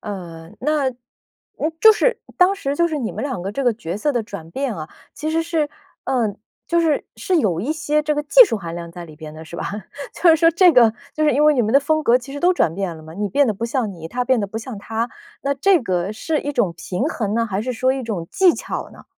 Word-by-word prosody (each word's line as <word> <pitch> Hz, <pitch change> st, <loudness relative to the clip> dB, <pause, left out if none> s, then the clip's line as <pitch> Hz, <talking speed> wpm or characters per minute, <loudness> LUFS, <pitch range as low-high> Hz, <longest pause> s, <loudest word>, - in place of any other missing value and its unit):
呃， 170 Hz, -5 st, -8 dB
那 290 Hz, -1 st, +1 dB
嗯， 250 Hz, +5 st, -8 dB
就 440 Hz, +3 st, +9 dB
是 480 Hz, +2 st, +1 dB, 0.2 s
当 365 Hz, +2 st, +5 dB
时 285 Hz, -8 st, -3 dB
就 340 Hz, +2 st, +2 dB
是 310 Hz, -3 st, -2 dB
你 235 Hz, -, -3 dB
们 -, -, -5 dB
两 260 Hz, -8 st, -3 dB
个 195 Hz, +2 st, -4 dB
这 275 Hz, -, -2 dB
个 245 Hz, -2 st, +3 dB
角 185 Hz, -4 st, -5 dB
色 295 Hz, +8 st, 0 dB
的 240 Hz, -2 st, 0 dB
转 200 Hz, -7 st, -9 dB
变 265 Hz, +3 st, -2 dB
啊， 155 Hz, 0 st, -6 dB, 0.3 s
其 310 Hz, +1 st, -3 dB
实 325 Hz, +1 st, +1 dB
是 325 Hz, -3 st, -1 dB, 0.3 s
呃， 230 Hz, -6 st, 0 dB, 0.3 s
就 340 Hz, 0 st, +2 dB
是 320 Hz, -3 st, +1 dB
是 375 Hz, -3 st, 0 dB
有 185 Hz, -, +1 dB
一 280 Hz, +9 st, -1 dB
些 300 Hz, -1 st, 0 dB
这 300 Hz, 0 st, 0 dB
个 295 Hz, -, 0 dB
技 -, -, +8 dB
术 300 Hz, -, -2 dB
含 170 Hz, -2 st, -6 dB
量 170 Hz, -1 st, -7 dB
在 175 Hz, 0 st, -9 dB
里 155 Hz, -2 st, -13 dB
边 155 Hz, 0 st, -10 dB
的， 155 Hz, +1 st, -10 dB
是 160 Hz, -, -12 dB
吧？ -, -, -4 dB, 0.5 s
就 355 Hz, -, +2 dB
是 320 Hz, -, +6 dB
说 330 Hz, +1 st, +5 dB
这 345 Hz, +1 st, +5 dB
个 235 Hz, -4 st, +6 dB, 0.2 s
就 310 Hz, -, -1 dB
是 300 Hz, -, +4 dB
因 290 Hz, +4 st, +3 dB
为 300 Hz, 0 st, +6 dB
你 245 Hz, -, +2 dB
们 220 Hz, -, -1 dB
的 275 Hz, -, +7 dB
风 310 Hz, +2 st, 0 dB
格 245 Hz, -3 st, +4 dB
其 260 Hz, +2 st, -11 dB
实 285 Hz, -, -6 dB
都 360 Hz, +3 st, +4 dB
转 165 Hz, -, +1 dB
变 185 Hz, -4 st, -3 dB
了 155 Hz, -, -12 dB
嘛， 160 Hz, +1 st, -11 dB
你 205 Hz, +2 st, -2 dB
变 280 Hz, +4 st, +3 dB
得 215 Hz, -, 0 dB
不 230 Hz, -, -4 dB
像 235 Hz, -3 st, -1 dB
你， 165 Hz, -1 st, -8 dB
他 250 Hz, +4 st, -2 dB
变 255 Hz, -2 st, +2 dB
得 200 Hz, -, -2 dB
不 220 Hz, -, -5 dB
像 230 Hz, 0 st, -7 dB
他。 225 Hz, +3 st, -3 dB, 0.3 s
那 280 Hz, 0 st, 0 dB
这 355 Hz, +6 st, +3 dB
个 185 Hz, -3 st, -1 dB
是 310 Hz, +8 st, -2 dB
一 290 Hz, -, -3 dB
种 225 Hz, -11 st, 0 dB
平 180 Hz, +7 st, -3 dB
衡 215 Hz, -8 st, -2 dB
呢， 230 Hz, 0 st, +1 dB
还 200 Hz, 0 st, -2 dB
是 255 Hz, +1 st, -2 dB
说 255 Hz, +3 st, +1 dB
一 265 Hz, 0 st, -3 dB
种 205 Hz, -8 st, -4 dB
技 370 Hz, -2 st, +5 dB
巧 -, -, -5 dB
呢？ -, -, -15 dB
245 Hz, 290 characters per minute, -21 LUFS, 200-300 Hz, 0.5 s, 就